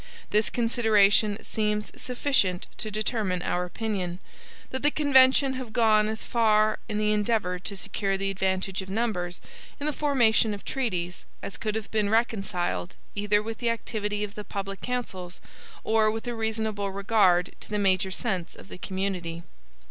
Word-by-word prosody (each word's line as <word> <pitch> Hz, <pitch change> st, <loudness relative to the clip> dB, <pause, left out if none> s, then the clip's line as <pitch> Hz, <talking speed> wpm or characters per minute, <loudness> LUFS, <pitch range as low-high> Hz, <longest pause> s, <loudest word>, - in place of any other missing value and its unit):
This 210 Hz, +1 st, +3 dB
consideration 215 Hz, -3 st, +3 dB
seems 210 Hz, -1 st, -1 dB
sufficient 245 Hz, -8 st, +1 dB
to 220 Hz, -, -2 dB
determine 210 Hz, -4 st, -1 dB
our 180 Hz, 0 st, 0 dB
opinion, 185 Hz, -2 st, -3 dB, 0.5 s
that 260 Hz, -, -2 dB
the 295 Hz, -, +4 dB
convention 270 Hz, -2 st, +5 dB
have 255 Hz, -4 st, -6 dB
gone 215 Hz, -2 st, +4 dB
as 220 Hz, 0 st, -4 dB
far 215 Hz, -2 st, +3 dB
in 210 Hz, -, -1 dB
the 210 Hz, 0 st, +2 dB
endeavor 210 Hz, -4 st, +1 dB
to 200 Hz, +2 st, -6 dB
secure 195 Hz, 0 st, -1 dB
the 195 Hz, 0 st, -1 dB
advantage 190 Hz, 0 st, -1 dB
of 190 Hz, -, -9 dB
numbers 190 Hz, -5 st, -2 dB, 0.4 s
in 290 Hz, -, -3 dB
the 300 Hz, -, +1 dB
formation 235 Hz, -8 st, +3 dB
of 200 Hz, -, -12 dB
treaties 180 Hz, -9 st, -2 dB, 0.2 s
as 195 Hz, -, -4 dB
could 215 Hz, -2 st, -3 dB
have 220 Hz, -2 st, -4 dB
been 215 Hz, -2 st, +1 dB
reconciled 195 Hz, -, 0 dB, 0.2 s
either 205 Hz, 0 st, +2 dB
with 225 Hz, 0 st, -5 dB
the 235 Hz, -, +1 dB
activity 210 Hz, -2 st, -2 dB
of 205 Hz, -1 st, -5 dB
the 210 Hz, -, -7 dB
public 195 Hz, -1 st, -5 dB
councils 190 Hz, -8 st, -4 dB, 0.4 s
or 220 Hz, -1 st, +3 dB
with 225 Hz, +1 st, -3 dB
a 240 Hz, -, -2 dB
reasonable 220 Hz, -3 st, -1 dB
regard 195 Hz, -3 st, +3 dB
to -, -, -12 dB
the 210 Hz, -, -1 dB
major 190 Hz, -2 st, +2 dB
sense 190 Hz, -3 st, -3 dB
of -, -, -13 dB
the -, -, -9 dB
community. 185 Hz, -4 st, -3 dB
210 Hz, 165 wpm, -27 LUFS, 190-225 Hz, 0.5 s, convention